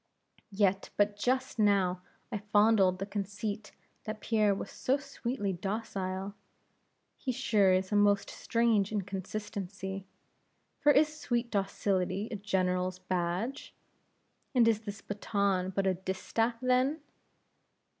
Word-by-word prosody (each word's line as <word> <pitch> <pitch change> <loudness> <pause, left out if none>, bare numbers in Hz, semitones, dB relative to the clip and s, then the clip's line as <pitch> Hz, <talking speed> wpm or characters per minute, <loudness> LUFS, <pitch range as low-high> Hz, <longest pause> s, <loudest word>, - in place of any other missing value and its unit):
Yet 195 -1 +1
but 205 0 +3
just 255 +3 -1
now 195 -4 +3 0.3
I 210 - -2
fondled 205 -2 +4
the 195 - -3
conceit 205 +1 -4 0.3
that 215 0 -4
Pierre 215 -3 +2
was 195 - -6
so 265 +2 +1
sweetly 235 -7 -3
docile! 195 0 -3 0.9
Here 260 - -1
sure 205 -5 +3
is 185 +1 +1
a - - +2
most 205 -1 +4
strange 230 -4 +1
inconsistency! 195 -1 -4 0.7
For 295 - +5
is 305 +1 +4
sweet 240 -1 -1
docility 195 0 0
a - - -2
general's 185 -2 0
badge? 185 +7 -2 0.8
and 240 -2 +6
is 225 -2 +3
this 205 -2 -7
baton 200 -2 0
but 195 +1 -1
a 190 - +3
distaff 190 +6 -1
then? 255 +4 +2
205 Hz, 120 wpm, -31 LUFS, 190-225 Hz, 0.9 s, and